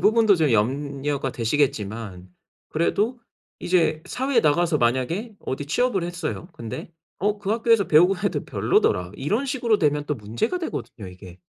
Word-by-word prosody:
부분도 220 -1 +5
좀 155 -4 +2
염려가 135 +4 0
되시겠지만 110 -7 -2 0.4
그래도 215 +9 0 0.4
이제 165 -3 +1
사회에 260 -1 +1
나가서 160 0 +2
만약에 135 - 0
어디 135 +2 -5
취업을 205 - +1
했어요. 170 0 -4
근데 115 +7 -7 0.3
"어 205 +2 0
그 200 0 -4
학교에서 225 -2 +3
배우고 180 +5 +5
해도 200 -1 -1
별로더라." 90 +1 +1
이런 210 - -1
식으로 240 -5 +1
되면 150 -2 +1
또 150 - -1
문제가 115 - -2
되거든요 120 - -6
이게. 90 -1 -13
155 Hz, 355 characters per minute, -24 LUFS, 125-210 Hz, 0.4 s, 부분도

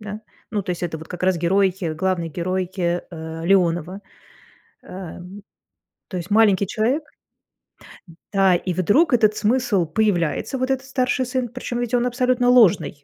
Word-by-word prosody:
да. 210 0 -7 0.3
Ну, 210 -2 -1
то 180 - -5
есть 175 0 -4
это 160 -2 -4
вот 160 - -12
как 180 0 -8
раз 185 -1 +2
герой, 190 +2 +2 0.2
главный 175 0 -1
герой, 185 +2 -3
э, 175 -1 0 0.4
Леонова. 175 0 +1 0.8
Эм, 185 +2 -9 0.7
то 185 - -6
есть 175 +3 -8
маленький 205 -2 +4
человек. 240 - 0 1.3
Да, 195 -2 +4
и 180 +1 -2
вдруг 225 - +2
этот 215 -3 +3
смысл 215 -5 +1
появляется, 200 - 0
вот 255 - -1
этот 265 0 -2
старший 255 -1 0
сын, 250 -1 -2
причём 245 -1 -5
ведь 245 -1 -3
он 240 - +1
абсолютно 250 0 +1
ложный. 170 - +4
195 Hz, 150 wpm, -21 LUFS, 180-245 Hz, 1.3 s, маленький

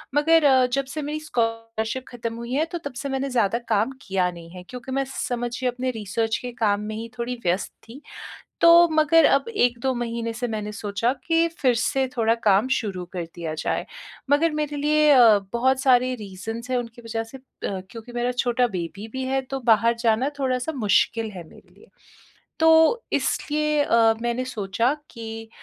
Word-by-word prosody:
मगर 310 0 +5 0.2
जब 275 +1 +1
से 305 - -2
मेरी 300 +1 -3
स्कॉलरशिप 225 -3 -2
ख़त्म 230 -2 -5
हुई 235 +2 -6
है 305 +4 +2
तो 345 - -2
तब 270 - -9
से 280 - -4
मैंने 270 +1 -2
ज़्यादा 235 -2 +1
काम 220 +3 +2
किया 190 -4 0
नहीं 170 -1 -12
है 180 0 -10
क्योंकि 250 +1 -8
मैं 275 +1 0
समझिए 245 +1 -2
अपने 255 +1 -2
रिसर्च 225 0 -2
के 250 - -5
काम 205 -1 +2
में 215 +1 -5
ही 230 +1 -6
थोड़ी 240 +1 -2
व्यस्त 180 +2 0 0.2
थी। 270 +5 -11 0.6
तो 340 0 +7
मगर 315 0 +4
अब 275 +10 +2
1-2 245 - +1
महीने 235 -1 -3
से 245 +2 -3
मैंने 210 -1 -4
सोचा 210 +3 -1
कि 330 0 +3
फिर 255 -4 +3
से 265 +3 +1
थोड़ा 225 -1 +3
काम 205 +4 +4
शुरू 190 -5 -4
कर 175 -2 -3
दिया 165 -3 -5
जाए। 155 - -2 0.5
मगर 315 +3 +4
मेरे 300 -1 -2
लिए 295 +1 0 0.2
अ, 235 -6 +7
बहुत 260 +2 +2
सारे 255 -1 +3
रीज़न्स 225 +3 -7
हैं 255 - +1
उनकी 235 0 -7
वजह 225 0 -3
से 245 +4 -12
अ, - - -22 0.5
क्योंकि 230 +3 -10
मेरा 240 +1 -1
छोटा 245 0 +1
बेबी 195 +1 -6
भी 260 0 -3
है 265 +1 0
तो 270 - -2
बाहर 230 -1 +3
जाना 230 +3 +2
थोड़ा-सा 255 +2 -1
मुश्किल 220 0 +1
है 185 -3 -8
मेरे - - -19
लिए। - - -19 0.7
तो 320 +8 +5
इसलिए 300 0 0
अ, 225 -1 +4
मैंने 240 +1 -1
सोचा 230 0 -1 0.2
कि 225 -1 -8
240 Hz, 185 wpm, -24 LUFS, 225-270 Hz, 0.7 s, तो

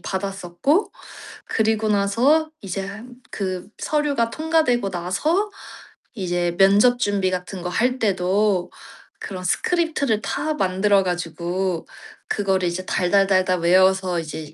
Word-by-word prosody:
받았었고 195 - -1 0.5
그리고 220 0 0
나서 235 +11 +2
이제 195 +2 -5 0.3
그 185 -2 -4
서류가 285 -6 0
통과되고 310 -10 +1
나서 300 - 0 0.6
이제 175 -4 -1
면접 205 +6 +5
준비 200 -4 0
같은 180 +1 -5
거 180 - -3
할 250 +7 +1
때도 195 -2 +1 0.5
그런 185 -2 -7
스크립트를 300 - 0
다 295 +10 -2
만들어 195 -2 +2
가지고 175 0 -3 0.4
그거를 190 -3 0
이제 180 +2 -3
달달달달 185 -1 +2
외워서 185 +1 +3
이제 155 -1 -7
195 Hz, 250 characters per minute, -22 LUFS, 180-230 Hz, 0.6 s, 면접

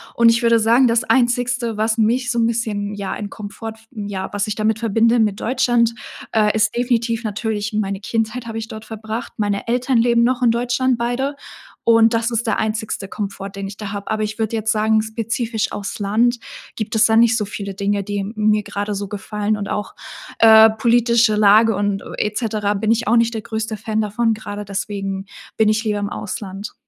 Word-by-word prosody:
und 235 -1 +6
ich 230 0 +3
würde 230 -1 +4
sagen, 235 +4 +4
das 230 +1 +2
einzigste, 245 -2 +1
was 220 +1 0
mich 245 +3 +2
so 235 - 0
'n 230 - +3
bisschen 210 -3 -2
ja 200 -1 -4
in 205 -1 -5
Komfort 220 +2 -7
f 225 0 -23
ja, 200 -5 -5
was 205 0 -1
ich 210 - -2
damit 215 0 0
verbinde 230 +1 +2
mit 210 -2 +1
Deutschland, 240 -2 +2 0.4
äh, 210 -1 +2
ist 215 0 +1
definitiv 235 -1 0
natürlich 215 0 -3
meine 200 -2 -1
Kindheit 225 +3 -2
habe 225 -1 -5
ich 225 0 -5
dort 220 -1 -9
verbracht. 220 +1 -6
Meine 205 0 -1
Eltern 250 0 +1
leben 235 0 +3
noch 250 +1 +1
in 240 - +4
Deutschland 245 +2 +1
beide 245 +4 -1 0.5
und 230 0 +5
das 230 +1 0
ist 230 0 -1
der - - +1
einzigste 215 -2 -2
Komfort, 200 -1 -5
den 195 -1 -6
ich 200 - -9
da 210 -2 -6
habe. 200 0 -6
Aber 215 0 0
ich 215 +1 -4
würde 220 0 -1
jetzt 220 0 0
sagen 220 0 +2
spezifisch 225 0 -2
auf's 205 +1 -5
Land 230 +4 +1 0.4
gibt 215 +1 -4
es 220 0 +5
da 220 - +3
nicht 235 +1 +5
so 210 - -1
viele 200 -1 -6
Dinge, 200 +1 -1
die 200 0 -3
mir 215 0 +2
gerade 205 +1 -4
so 200 0 -4
gefallen 210 +1 -2
und 200 -1 -4
auch, 210 - -3 0.5
äh, 220 0 +8
politische 235 0 +3
Lage 215 +1 +5
und 205 0 -1 0.2
et 210 0 -1
cetera 210 -3 -1
bin 215 +2 0
ich 230 -1 0
auch 235 +2 +4
nicht 230 0 +2
der 220 - -3
größte 220 +1 -4
Fan 220 +1 -2
davon, 225 +2 0
gerade 205 -1 -6
deswegen 195 -1 -4 0.3
bin 220 -1 +3
ich 215 +1 +1
lieber 210 -2 -1
im 205 - -2
Ausland. 200 0 -6
220 Hz, 205 wpm, -20 LUFS, 205-230 Hz, 0.5 s, äh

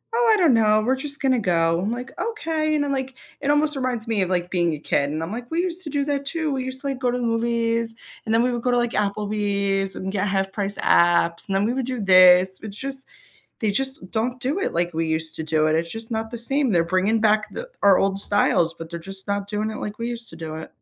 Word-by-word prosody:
"Oh, 475 -1 +3
I 430 - +5
don't 330 -9 +4
know, 215 -1 +4
we're 260 +1 +2
just 285 +2 -5
gonna 260 -3 +2
go. 165 -3 +2
I'm 205 - -1
like, 250 +1 -5
"Okay," 320 -9 -1
you 305 - +2
know, 290 -1 0
like, 265 -1 -3 0.3
it 285 - -1
almost 295 +1 +2
reminds 250 -4 -2
me 215 -4 +1
of, 185 - 0
like, 180 -1 -1
being 170 -3 +1
a 150 - -5
kid, 140 -1 0
and 155 +2 -3
I'm 170 - -5
like, 240 +2 -6
"We 330 +1 0
used 360 0 -3
to - - -4
do 285 -1 -1
that 285 -1 -1
too. 315 +1 -2
We 260 -1 -2
used 260 0 -6
to, 280 - -4
like, 270 -2 -3
go 250 -2 +1
to 250 - -1
the 245 - -3
movies, 230 0 0 0.3
and 220 - -1
then 230 +1 +4
we 250 - +1
would 240 - -3
go 250 - 0
to 245 - +3
like 240 -1 +1
Applebee's 200 -1 -1
and 190 0 -4
get 200 0 0
half-price 195 +1 -1
apps, 170 -1 +3
and 195 - 0
then 200 +2 +2
we 240 - 0
would 260 -1 -2
do 255 -2 -3
this." 185 -1 +6
It's 210 -1 -8
just, 270 0 -6 0.5
they 215 -4 +1
just 265 -5 -3
don't 245 +3 -1
do 280 +10 -1
it - - -1
like 175 0 -1
we 165 0 -1
used 160 0 -2
to 160 - -3
do 155 0 +1
it. 155 - +2
It's 165 +1 -1
just 225 +1 -7
not 220 0 -2
the 235 - -6
same. 270 +1 0
They're 170 -2 +3
bringing 185 +6 +1
back 215 0 +3
the - - -7
our 200 -2 +6
old 195 0 +1
styles, 170 -5 +2
but 165 0 -9
they're 170 - -5
just 195 +3 -9
not 200 0 -2
doing 215 +1 -2
it - - -6
like 210 0 -5
we 230 +1 -3
used 235 -1 -6
to 165 - -11
do 160 -1 -6
it. 160 - -8
220 Hz, 275 wpm, -23 LUFS, 190-260 Hz, 0.5 s, this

